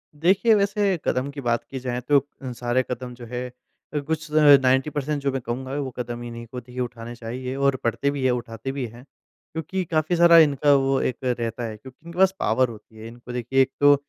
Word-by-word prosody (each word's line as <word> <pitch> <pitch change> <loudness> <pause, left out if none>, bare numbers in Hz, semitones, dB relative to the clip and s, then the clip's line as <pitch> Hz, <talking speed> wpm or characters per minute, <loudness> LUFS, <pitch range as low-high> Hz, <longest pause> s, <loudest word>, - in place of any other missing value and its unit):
देखिए, 190 +9 +4
वैसे 200 -2 +1
कदम 130 +2 0
की 140 0 -7
बात 120 -2 0
की 135 - -7
जाए 125 -1 -3
तो 140 +3 +4 0.2
अ, 130 -2 -5
सारे 120 +2 0
कदम 125 0 -5
जो 120 0 -10
है 125 +1 -4 0.5
अ, 150 - 0
कुछ 155 +1 -3
90% 145 0 +4
जो 140 - +1
मैं 135 0 -3
कहूँगा 130 +3 -4
वो 135 -2 -3
कदम 120 0 -4
इन्ही 115 0 -7
को 125 +2 -7
देखिए 125 +1 -7
उठाने 120 -1 -6
चाहिए 125 +3 -5
और 140 0 +2
पढ़ते 140 +4 0
भी 140 -2 -4
हैं, 130 - +4
उठाते 120 +1 -4
भी 135 -2 -3
हैं। 120 +3 -13 0.5
क्योंकि 180 +4 -3
काफ़ी 155 +2 +1
सारा 170 0 +7
इनका 145 -2 +5
वो 135 0 +2
एक 125 - -1
रहता 120 -2 -2
है 110 -2 -5
क्योंकि 130 +7 -15
इनके 170 +1 -10
पास 190 0 +6
पॉवर 125 +3 +2
होती 110 0 -13
है। 110 - -9
इनको 120 +1 -11
देखिए 125 +2 +1
एक 135 0 +2
तो 145 0 +7
130 Hz, 215 wpm, -24 LUFS, 120-145 Hz, 0.5 s, सारा